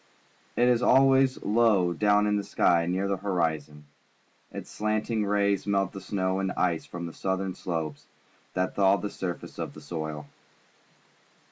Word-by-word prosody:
It 120 - +3
is 125 -1 +3
always 135 +1 +4
low 105 -5 +3
down 105 +2 +3
in 105 0 +1
the 100 - +1
skj^ 85 -3 +2
near 95 +2 0
the 100 0 -1
horizon. 80 -6 -2 0.7
Its - - -8
slanting 110 0 -1
rays 100 -1 +1
melt 100 -2 +1
the 95 - -8
snow 95 -1 -1
and 95 -1 -1
ice 85 -3 0
from 85 -1 -6
the 85 - -7
southern 95 0 -2
slopes 80 -6 -4 0.5
and 90 0 0
thaw 100 0 +4
the 105 - -5
surface 90 -2 -6
of - - -5
the - - -10
soil. 80 -3 -5
95 Hz, 155 wpm, -27 LUFS, 85-105 Hz, 0.7 s, always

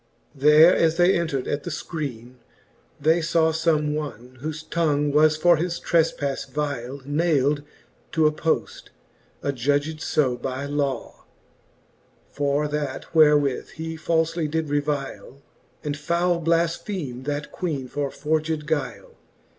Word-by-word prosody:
There 150 +5 +6
as 165 0 +2
they 180 +2 +5
entred 160 -6 -1
at 145 - -2
the - - -4
fcriene, 130 -7 -6 0.6
they 160 +4 +3
faw 160 0 +2
Some 155 -2 +1
one, 130 -4 -6
whofe 155 +1 -5
tongue 150 -3 +1
was 155 +1 +4
for 175 +1 +5
his 170 +1 -2
trefpafle 155 -4 0
vyle 140 -3 -3
Nayld 145 -1 +1 0.5
to 160 -1 +3
a 155 - +5
poft, 160 +1 -2 0.6
adjudged 145 +3 0
fe 130 -7 +1
by 130 +2 -4
law: 140 -2 -3 1.1
For 145 +1 0
that 150 -1 -3
therewith 150 -4 +4
he 160 0 -5
falfely 165 0 0
did 160 0 -2
revyle. 145 -2 -3 0.4
And 145 -1 -2
foule 170 +3 0
blafpheme 165 -5 -1
that 145 +1 -3
Queene 150 -8 -3
for 140 +2 -2
forged 155 +1 -1
guyle. 150 -2 -3
150 Hz, 125 wpm, -24 LUFS, 140-160 Hz, 1.1 s, There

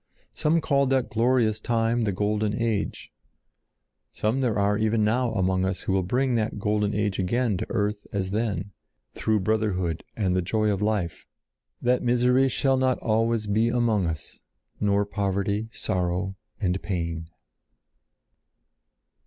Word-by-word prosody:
Some 160 +2 +2
called 140 -3 +2
that 130 -2 +1
glorious 115 -2 +2
time 115 +1 +1
the 100 - +1
Golden 105 +2 0
Age; 115 -3 -2 1.0
some 110 +6 -1
there 120 -5 +1
are 100 +1 +2
even 110 0 +1
now 120 +3 +1
among 95 -2 +1
us 95 0 -1
who - - -2
will 95 - +2
to 90 - -5
bring 130 +4 +1
that 110 -2 0
golden 105 0 0
age 105 -2 0
again 110 +4 +1
to 110 - -4
earth 105 -2 -1
as 95 -2 -2
then, 100 -3 -2 0.4
through 110 -2 0
brotherhood 95 -5 0
and 95 -4 0
the 95 - +2
joy 105 +4 +1
of 100 -1 -2
life, 105 -5 -1 0.6
that 125 +1 +2
misery 125 +2 +3
shall 135 +1 +2
not 130 -1 +2
always 115 0 +1
be 110 +3 +2
among 115 -6 +1
us, 80 -3 -6 0.4
nor 100 0 +2
poverty, 100 +1 -1
sorrow, 90 -1 -2 0.2
and 95 -3 0
pain. 85 -4 -3
105 Hz, 145 wpm, -26 LUFS, 95-115 Hz, 1.0 s, misery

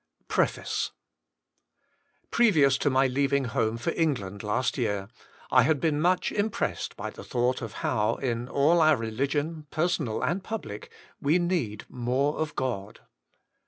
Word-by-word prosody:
Law, - - -12
160 - - +2 0.3
PREFACE - - -30 1.4
PREVIOUS 155 - +4
to - - +2
my 135 0 +3
leaving 140 +1 +1
home 115 -3 0
for 120 +8 -1
England 105 - -1
last 105 +4 0
year, 100 -5 -1 0.4
I 130 - +7
had 140 +3 +2
been 150 -1 +1
much 180 +2 +2
impressed 215 +1 -2
by - - -4
the - - -10
thought 125 +1 0
of 115 -3 -6
how, 110 -2 +1
in 120 -2 -2
all 160 +5 +4
our 155 -1 +6
religion, 140 +7 -2
personal 155 -8 0
and 185 +2 0
public, 190 - -6 0.3
we 150 +5 +3
need 170 - -1
more 130 +4 -1
of 155 -1 -2
God. 110 -6 -3
135 Hz, 150 wpm, -27 LUFS, 115-155 Hz, 1.4 s, I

